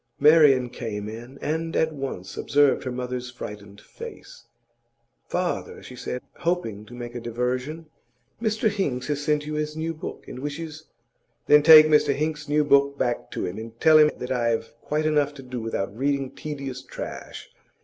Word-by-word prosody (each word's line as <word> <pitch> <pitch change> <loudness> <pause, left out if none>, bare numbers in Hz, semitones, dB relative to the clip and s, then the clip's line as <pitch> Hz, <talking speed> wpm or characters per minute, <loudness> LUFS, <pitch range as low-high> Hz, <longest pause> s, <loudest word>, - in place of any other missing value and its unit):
Marian 145 -5 +6
came 105 -4 -5
in, 120 +5 -9
and 165 +2 -2
at 160 0 +2
once 130 -10 -6
observed 145 -1 +3
her 130 - -2
mother's 125 0 -4
frightened 105 -4 -9
face. 470 - -11 0.8
'Father,' 460 - -2
she 125 - -10
said, 125 0 -5
hoping 140 - -2
to 120 - -11
make 120 -1 -7
a 120 - -4
diversion, 125 +7 -3 0.6
'Mr 220 -1 +1
Hinks 170 -12 -1
has 145 0 -1
sent 150 0 +1
you 155 - -4
his 150 0 -3
new 165 +1 -2
book, 155 - -8
and 125 - -8
wishes 155 +2 -6 0.3
' - - -46
'Then 150 0 +7
take 155 0 +10
Mr 150 -2 +4
Hinks's 150 0 -2
new 150 +1 +3
book 140 -1 +3
back 120 -3 -1
to - - -3
him, 90 +4 -5
and 115 +1 -9
tell 155 -1 +7
him 150 0 +7
that 125 +1 -5
I 120 -2 +1
have 115 -1 -1
quite 155 +1 -1
enough 150 -2 +2
to 135 - -10
do 125 -2 -5
without 105 -3 -3
reading 135 +1 0
tedious 140 -4 -6
trash. - - -8
140 Hz, 180 wpm, -25 LUFS, 125-155 Hz, 0.8 s, take